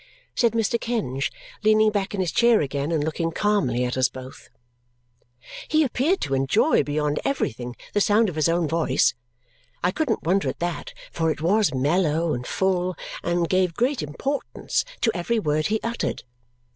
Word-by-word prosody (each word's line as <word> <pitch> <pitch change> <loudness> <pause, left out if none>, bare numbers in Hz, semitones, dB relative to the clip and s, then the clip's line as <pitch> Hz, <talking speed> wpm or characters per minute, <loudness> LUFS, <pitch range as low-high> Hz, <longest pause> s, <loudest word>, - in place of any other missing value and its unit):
said 235 -2 +2
Mr. 230 +1 +1
Kenge, 160 - -1 0.3
leaning 215 0 +4
back 205 -1 -2
in 195 - -1
his 180 - -1
chair 235 -2 +4
again 140 +1 -2
and 155 -3 +1
looking 165 +2 -1
calmly 165 - +1
at 125 - -2
us 130 0 +2
both. 130 0 -11 1.2
He 310 +1 +3
appeared 295 +8 +1
to 135 - -2
enjoy 135 0 +3
beyond 150 0 -1
everything 125 - -2 0.2
the 205 - +2
sound 215 +2 +4
of 180 - -3
his 155 +1 +2
own 170 -1 +1
voice. 160 -6 +2 0.7
I 180 - +3
couldn't 270 -1 -1
wonder 190 +4 +1
at - - -5
that, 175 0 -3 0.2
for 165 -1 0
it 155 - -2
was 190 0 +2
mellow 155 +3 +1
and 125 0 -4
full 185 -1 0 0.3
and 175 0 0
gave 185 -2 +1
great 255 +3 +1
importance 265 - -2 0.2
to 225 - +3
every 190 +7 0
word 155 -6 +1
he 220 +1 0
uttered. 235 +1 -2
175 Hz, 170 wpm, -24 LUFS, 150-215 Hz, 1.2 s, leaning